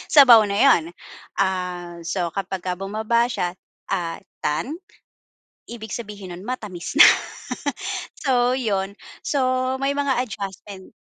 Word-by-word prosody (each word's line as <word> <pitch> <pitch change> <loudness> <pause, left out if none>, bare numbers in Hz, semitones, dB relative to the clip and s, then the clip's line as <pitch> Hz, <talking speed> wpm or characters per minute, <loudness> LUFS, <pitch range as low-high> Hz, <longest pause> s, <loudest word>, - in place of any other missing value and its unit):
Sabaw 240 -7 +9
na 200 - -2
'yon. 270 - +5 0.5
Ah, 180 -2 -2
so 170 0 -2
kapagka 185 -1 -3
bumaba 220 +4 +1
siya, 180 -7 -2 0.4
ah, 170 -4 -1 0.2
"糖," 270 - -2 0.9
ibig 220 -3 -8
sabihin 205 -5 -7
nun, 180 - -11
matamis 210 -9 -5
na. - - +12 1.1
So, 250 -3 +2
'yon. 200 -4 -1 0.3
So, 285 - 0 0.4
may 275 +1 +1
mga 280 -3 +1
adjustment. 200 -3 -8
200 Hz, 115 wpm, -23 LUFS, 180-240 Hz, 1.1 s, na